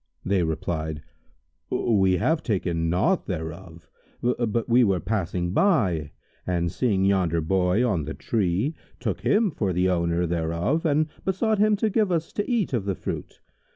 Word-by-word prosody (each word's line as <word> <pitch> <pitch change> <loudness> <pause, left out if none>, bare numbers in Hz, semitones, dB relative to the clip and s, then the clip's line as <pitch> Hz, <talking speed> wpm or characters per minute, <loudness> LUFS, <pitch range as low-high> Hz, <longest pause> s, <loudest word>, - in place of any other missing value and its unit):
They 95 -1 +2
replied 80 -2 -3 0.7
"We 95 -5 +2
have 160 - +1
taken 85 -6 -1
naught 165 - +1
thereof; 85 -1 -6 0.4
but 120 -2 0
we 120 +1 +5
were 95 -5 +2
passing 90 -3 -2
by 95 - +2 0.4
and 85 -2 0
seeing 100 -5 +1
yonder 90 -4 +2
Boy 90 +7 +2
on 90 -10 0
the 80 - -5
tree, 105 - 0 0.3
took 105 -7 -3
him 195 - +2
for 100 -9 -1
the 90 +2 +2
owner 85 -1 +1
thereof 85 - 0
and 155 +1 +2 0.2
besought 205 +3 0
him 215 0 +4
to 215 +1 0
give 210 -2 +2
us 165 -2 -1
to 205 - -2
eat 230 - 0
of 115 -6 0
the 100 -2 -1
fruit. - - -6
95 Hz, 155 wpm, -25 LUFS, 85-130 Hz, 0.7 s, we